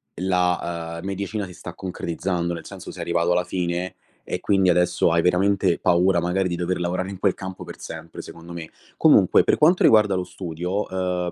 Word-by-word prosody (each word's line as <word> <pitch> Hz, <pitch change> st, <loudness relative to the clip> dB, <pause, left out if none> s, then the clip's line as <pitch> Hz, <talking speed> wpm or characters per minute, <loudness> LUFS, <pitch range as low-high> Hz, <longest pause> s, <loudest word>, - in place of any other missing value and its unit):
la, 85 Hz, -2 st, -1 dB
uhm, -, -, -10 dB
medicina 100 Hz, +2 st, -3 dB
si 90 Hz, -, -11 dB
sta 90 Hz, 0 st, -9 dB
concretizzando, 90 Hz, -1 st, -3 dB
nel 80 Hz, -1 st, -7 dB
senso -, -, -9 dB
sei -, -, -8 dB
arrivato 85 Hz, 0 st, +1 dB
alla 90 Hz, 0 st, +2 dB
fine 90 Hz, 0 st, -3 dB, 0.3 s
e -, -, -4 dB
quindi 95 Hz, -2 st, +2 dB
adesso 90 Hz, -1 st, +2 dB
hai 85 Hz, -, +3 dB
veramente 95 Hz, 0 st, +2 dB
paura 90 Hz, +1 st, +3 dB
magari 90 Hz, +2 st, 0 dB
di 85 Hz, -, -2 dB
dover 90 Hz, +1 st, -2 dB
lavorare 90 Hz, +2 st, -2 dB
in 95 Hz, -, -8 dB
quel 100 Hz, -1 st, +2 dB
campo 95 Hz, -1 st, -7 dB
per -, -, -10 dB
sempre, 80 Hz, 0 st, -8 dB
secondo 85 Hz, +1 st, -11 dB
me. 80 Hz, -2 st, -7 dB, 0.3 s
Comunque -, -, +5 dB
per -, -, +2 dB
quanto 170 Hz, +4 st, +4 dB
riguarda 105 Hz, -3 st, +5 dB
lo 90 Hz, -, -1 dB
studio, 90 Hz, +2 st, -4 dB
uhm, 90 Hz, -1 st, -2 dB
90 Hz, 190 wpm, -23 LUFS, 85-95 Hz, 0.3 s, Comunque